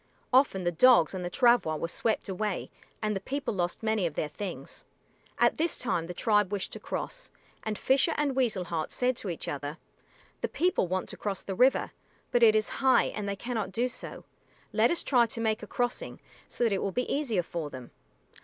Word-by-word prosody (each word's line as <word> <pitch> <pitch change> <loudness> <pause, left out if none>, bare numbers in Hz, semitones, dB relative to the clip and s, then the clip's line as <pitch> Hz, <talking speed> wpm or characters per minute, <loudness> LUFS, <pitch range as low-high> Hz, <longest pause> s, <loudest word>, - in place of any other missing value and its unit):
Often 255 -8 +4
the 175 - +1
dogs 175 -2 +5
and 185 -1 -4
the 175 - -2
travois 235 -7 +3
were 160 - -2
swept 220 +6 -1
away 195 +1 -3 0.3
and 215 -1 0
the - - -1
people 270 +5 -3
lost 175 +1 -2
many 220 -4 +1
of 160 - -7
their 155 - -1
things. 185 +5 -6 0.5
At - - +3
this 330 +1 +1
time 170 -9 -1
the 180 - -5
tribe 210 -2 +2
wished 205 -2 -2
to - - -5
cross, - - -5 0.3
and 215 -1 -3
Fisher 275 - +3
and 285 -3 0
Weasel 230 -8 +1
Heart 165 -3 -3
said 250 0 +1
to 200 - -4
each 170 - -5
other, 145 +2 -4 0.6
"The - - 0
people 360 - +1
want 185 +1 -2
to - - -6
cross 200 -3 -3
the 195 - -4
river, 255 +7 +3 0.4
but 245 -1 +3
it 220 -2 +7
is 215 -1 +2
high 265 -1 +4
and 205 -2 -3
they 200 - -1
cannot 220 -2 -3
do 235 +6 +1
so. 250 - -7 0.5
Let - - +4
us 340 - 0
try 245 -4 +4
to 230 - -5
make 220 -1 0
a 210 - -8
crossing, 245 +2 -2 0.3
so - - -2
that 230 -3 +3
it 195 - 0
will 195 - -1
be 250 +6 -1
easier 240 -11 0
for 165 -3 -4
them." 130 -3 -10
215 Hz, 210 wpm, -29 LUFS, 180-245 Hz, 0.6 s, it